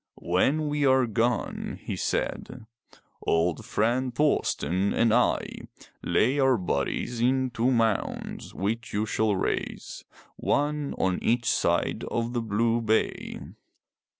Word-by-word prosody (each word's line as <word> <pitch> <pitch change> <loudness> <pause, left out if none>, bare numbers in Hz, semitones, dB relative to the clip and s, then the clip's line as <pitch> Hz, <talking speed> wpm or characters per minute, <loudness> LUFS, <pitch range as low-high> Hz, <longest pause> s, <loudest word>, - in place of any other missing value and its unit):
"When 135 - +1
we 145 0 0
are 130 -2 +4
gone/' 115 +2 -1
he - - -5
said, - - -3 0.6
old 85 0 +1
friend 120 +3 0
Thorsten 100 - +1
and 115 -1 +3
I, 125 +1 +2 0.6
lay 130 +6 +2
our 135 -2 +4
bodies 90 - -2
in 130 +1 +2
two 120 +1 +1
mounds, 115 -5 -1
which 110 +4 -3
you 105 +1 0
shall 110 -1 +1
raise, 95 - -3 0.3
one 145 0 0
on 95 -1 0
each 120 0 +1
side - - +1
of 120 +1 -2
the 120 - 0
blue 115 +2 +1
bay. 110 0 -1
115 Hz, 125 wpm, -27 LUFS, 105-130 Hz, 0.6 s, are